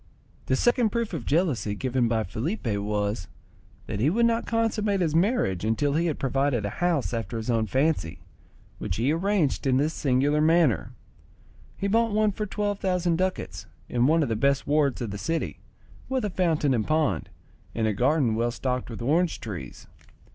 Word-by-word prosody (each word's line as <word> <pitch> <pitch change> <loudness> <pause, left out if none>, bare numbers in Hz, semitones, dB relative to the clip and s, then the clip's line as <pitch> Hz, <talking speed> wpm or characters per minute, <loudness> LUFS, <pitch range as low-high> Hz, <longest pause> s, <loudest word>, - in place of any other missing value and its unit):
The 130 - +2
second 240 - +3
proof 230 -2 -2
of 150 -8 -5
jealousy 140 - +1
given 125 +1 0
by 115 -1 +1
Felipe 130 - -4
was, 100 -1 -2 0.6
that - - -4
he 130 +7 +3
would 230 +7 +2
not 230 0 +1
consummate 215 -3 0
his 165 -4 0
marriage 165 - +1
until 115 +7 +1
he 165 +3 +1
had 155 - -1
provided 135 -4 0
a 100 - -2
house 170 -8 +1
after 115 0 -3
his 115 +2 -2
own 110 -2 +1
fancy, 135 - 0 0.6
which - - -3
he 120 +7 +1
arranged 175 -5 0
in 130 -1 +3
this 150 +4 +1
singular 145 +2 +1
manner. 160 - +3 0.8
He 200 - -1
bought 225 +1 +2
one 215 0 +3
for 210 +2 -4
twelve 205 0 -2
thousand 180 -3 +1
ducats, 185 0 -3 0.2
in 120 +1 +2
one 160 +1 +3
of 135 - -2
the 115 - 0
best 140 +4 +1
wards 145 -3 +1
of 115 -4 -3
the 105 - -5
city, 165 +6 -2 0.5
with 260 -4 0
a 205 - -2
fountain 160 -6 +1
and 110 -4 0
pond, 155 - 0 0.5
and 115 - 0
a 110 - +1
garden 130 +2 +2
well 115 +2 +1
stocked 125 +1 -3
with 115 0 -6
orange 165 +6 +1
trees. 100 -6 -7
145 Hz, 185 wpm, -26 LUFS, 115-180 Hz, 0.8 s, second